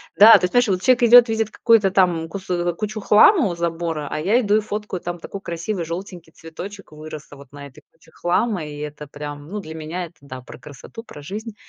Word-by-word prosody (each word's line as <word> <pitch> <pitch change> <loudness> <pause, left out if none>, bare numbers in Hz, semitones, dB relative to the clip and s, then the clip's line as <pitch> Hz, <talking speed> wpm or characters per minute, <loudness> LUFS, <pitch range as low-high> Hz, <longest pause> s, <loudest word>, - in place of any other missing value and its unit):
Да, 215 +2 +9
то - - -8
есть, 180 - -5
понимаешь, 245 -3 +3
вот 185 -1 0
чек 250 -1 +3
идет, 240 +1 +8
видит 220 -1 -1
какую-то 220 -5 +3
там 175 -4 +1
кус 195 0 -8 0.3
кучу 215 0 -4
хлама 225 - +5
у 170 - -4
забора, 165 -3 -3
а 155 - -4
я 210 +9 +2
иду 210 -3 +1
и 215 - +2
фоткаю, 210 -3 -5
там 175 0 -5
такой 195 +3 -8
красивый 170 +2 -4
желтенький 170 0 -8
цветочек 180 +3 -10
вырос 155 -1 -10
вот 140 -2 -14
на 140 0 -10
этой 135 - -18
куче 165 0 -24
хлама. 180 0 -1
И 145 -1 -9
это, 150 0 -7
прям, 145 +1 -9
ну, 210 +1 -5
для 160 -4 -9
меня 165 +3 -5
это, 170 - -16
да, 130 -2 -10
про - - -12
красоту, 145 - -12
про 150 - -12
жизнь. 210 +7 -7
175 Hz, 220 wpm, -21 LUFS, 155-210 Hz, 0.3 s, Да